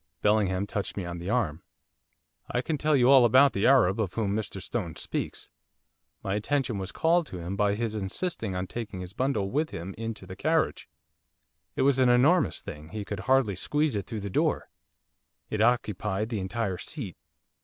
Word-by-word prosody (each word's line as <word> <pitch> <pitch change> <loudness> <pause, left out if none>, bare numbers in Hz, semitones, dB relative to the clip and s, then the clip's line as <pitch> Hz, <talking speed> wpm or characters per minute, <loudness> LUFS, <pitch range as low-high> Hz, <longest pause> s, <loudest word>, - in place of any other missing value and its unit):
Bellingham 100 -2 +2
touched 100 0 -4
me 95 - -3
on 85 0 -5
the 90 +3 -5
arm. 100 -10 0 0.9
'I 125 - -1
can 155 0 -2
tell 155 +1 +3
you 130 0 +5
about 130 +2 +6
the 100 - +2
Arab 115 -7 +5
of 100 -5 -2
whom 105 -3 0
Mr 105 -2 -3
Stone 90 -5 -4
speaks. - - -4 0.7
My 95 - -1
attention 120 +1 0
was 95 -1 -5
called 170 0 +2
to 90 - -7
him 90 +3 -4
by 100 0 +2
his 115 0 -2
insisting 110 - -2
on 90 +1 -2
taking 105 -2 -6
his 90 +1 -8
bundle 110 -6 -1
with 155 +3 0
him 90 +4 -6
into 115 -3 -5
the 95 0 -8
carriage, 160 - 0 0.9
it - - +1
was 135 -1 +3
an 130 -1 +5
enormous 140 +9 +4
thing, 80 -5 -9
he 105 +3 -5
could 105 - -5
hardly 130 -7 +3
squeeze 150 - 0
it 100 - -3
through 110 -4 -5
the 100 -1 -5
door; - - 0 0.8
it 110 - 0
occupied 110 -3 +1
the 110 -4 -2
entire 95 -1 -2
seat. 110 - -5
105 Hz, 185 wpm, -28 LUFS, 95-130 Hz, 0.9 s, about